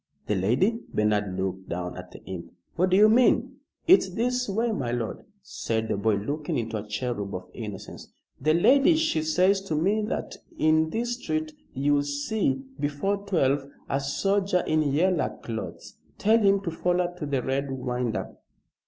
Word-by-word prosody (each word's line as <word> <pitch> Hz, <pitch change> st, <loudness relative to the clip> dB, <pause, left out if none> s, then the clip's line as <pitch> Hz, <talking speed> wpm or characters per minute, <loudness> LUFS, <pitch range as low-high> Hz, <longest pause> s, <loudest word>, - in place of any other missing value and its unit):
"The -, -, 0 dB
lady!" 125 Hz, -, +2 dB
Bernard 105 Hz, -3 st, 0 dB
looked 95 Hz, 0 st, -3 dB
down 90 Hz, 0 st, -4 dB
at 90 Hz, 0 st, -9 dB
the -, -, -13 dB
imp. 85 Hz, -3 st, -7 dB, 0.2 s
"What 185 Hz, +2 st, +2 dB
do 185 Hz, -, +4 dB
you 210 Hz, +1 st, +8 dB
mean?" 250 Hz, +3 st, +3 dB, 0.3 s
"It's 350 Hz, -, +6 dB
this 250 Hz, +4 st, -1 dB
way, 225 Hz, +4 st, 0 dB
my 125 Hz, -, -2 dB
lord," 120 Hz, -2 st, -3 dB, 0.2 s
said 110 Hz, -10 st, -3 dB
the -, -, +1 dB
boy, 105 Hz, +1 st, +1 dB
looking 120 Hz, +2 st, -2 dB
like 110 Hz, -1 st, -4 dB
a -, -, -18 dB
cherub 105 Hz, -2 st, -3 dB
of 90 Hz, 0 st, -8 dB
innocence. 105 Hz, -5 st, -8 dB, 0.3 s
"The 155 Hz, +3 st, +3 dB
lady, 275 Hz, -, +5 dB
she 315 Hz, -, +1 dB
says 180 Hz, +5 st, +3 dB
to 195 Hz, -5 st, -3 dB
me 195 Hz, +8 st, +2 dB
that -, -, -4 dB, 0.2 s
in 155 Hz, 0 st, +3 dB
this 240 Hz, +5 st, -2 dB
street 155 Hz, -1 st, -2 dB, 0.2 s
you'll 145 Hz, +2 st, +2 dB
see, 205 Hz, -, -1 dB, 0.2 s
before 150 Hz, +8 st, 0 dB
twelve, 140 Hz, -7 st, +1 dB, 0.2 s
a 135 Hz, -, +1 dB
soldier 195 Hz, +6 st, +1 dB
in 155 Hz, 0 st, +2 dB
yeller 175 Hz, +3 st, +1 dB
clothes. 110 Hz, -2 st, -7 dB, 0.2 s
Tell 220 Hz, +3 st, +4 dB
him 200 Hz, -2 st, +3 dB
to 175 Hz, -4 st, -3 dB
foller 175 Hz, +1 st, 0 dB
to 150 Hz, -, -3 dB
the 135 Hz, -3 st, -1 dB
Red 135 Hz, +1 st, -1 dB
Winder." 125 Hz, -3 st, -3 dB
155 Hz, 170 wpm, -26 LUFS, -, 0.3 s, you